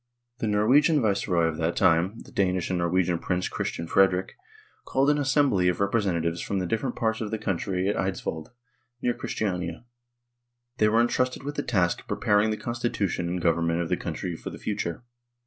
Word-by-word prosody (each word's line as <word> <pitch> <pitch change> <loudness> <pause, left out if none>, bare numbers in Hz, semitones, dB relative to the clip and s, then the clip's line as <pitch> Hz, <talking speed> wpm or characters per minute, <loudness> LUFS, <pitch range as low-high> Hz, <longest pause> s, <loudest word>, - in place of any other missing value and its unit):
The 110 - -1
Norwegian 130 +9 +4
viceroy 100 -6 +1
of 80 -1 -1
that 80 +1 -1
time 85 +6 +3
the - - -14
Danish 95 -2 0
and 90 - 0
Norwegian 85 0 +1
Prince 90 +1 -1
Christian 85 - -3
Frederick 95 +1 +2 0.5
called 135 +2 +2
an 150 - +1
assembly 130 -9 +2
of 90 - +1
representatives 90 -5 0
from 100 - -2
the 90 - -1
different 115 +6 -2
parts 110 0 -1
of 110 - -3
the 110 - -2
country 95 -2 -1
at 100 - +1
Eidsvold, 95 -4 -3 0.6
near 120 - +2
Christiania; 90 -3 -3 0.9
they 105 -1 +4
were 115 +2 +4
entrusted 125 +2 0
with 145 +1 -4
the 145 - -2
task 90 -10 +1
of - - -25
preparing 105 +1 +2
the 110 - -1
constitution 110 -8 -2
and 90 0 -3
government 85 0 +2
of 85 -2 -2
the - - +2
country 90 -2 -4
for - - -7
the - - -9
future. 100 -1 -3
95 Hz, 180 wpm, -26 LUFS, 85-115 Hz, 0.9 s, Norwegian